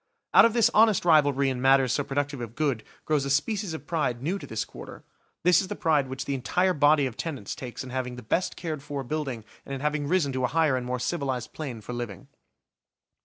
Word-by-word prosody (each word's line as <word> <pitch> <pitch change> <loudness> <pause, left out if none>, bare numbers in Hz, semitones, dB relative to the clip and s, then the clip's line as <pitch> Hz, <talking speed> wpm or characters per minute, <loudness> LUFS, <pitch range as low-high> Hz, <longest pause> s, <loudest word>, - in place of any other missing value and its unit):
Out - - +9
of 230 - +2
this 235 -3 +4
honest 215 -4 +4
rivalry 145 -4 +4
in 125 -1 -4
matters 135 -1 +4
so 145 - 0
productive 140 -1 -2
of 115 -1 -7
good, 140 -8 0 0.2
grows 150 -3 +1
a 140 - -3
species 190 +5 0
of - - -9
pride 130 -7 -1
new 185 +7 -1
to - - -9
this 110 -1 -3
quarter; - - -11 0.4
this 180 0 +5
is 190 - -5
the 205 - -4
pride 150 -7 +2
which 130 0 -5
the 140 - -2
entire 180 +8 +1
body 145 -1 +4
of 125 -4 -4
tenants 140 - -5
takes 125 0 -7
in 130 - -9
having 125 -1 -3
the 125 - -9
best 170 +11 -1
cared 155 -4 -4
for 145 -1 -5
building 135 -5 -4 0.2
and 140 - -5
in 135 - -6
having 150 -1 -1
risen 155 -5 +1
to 130 0 -2
a - - +3
higher 155 -1 +2
and 125 -1 -3
more 125 0 -1
civilised 130 -3 -3
plane 130 -8 -6
for 125 - -7
living. 120 -6 -6
140 Hz, 230 wpm, -27 LUFS, 125-160 Hz, 0.4 s, Out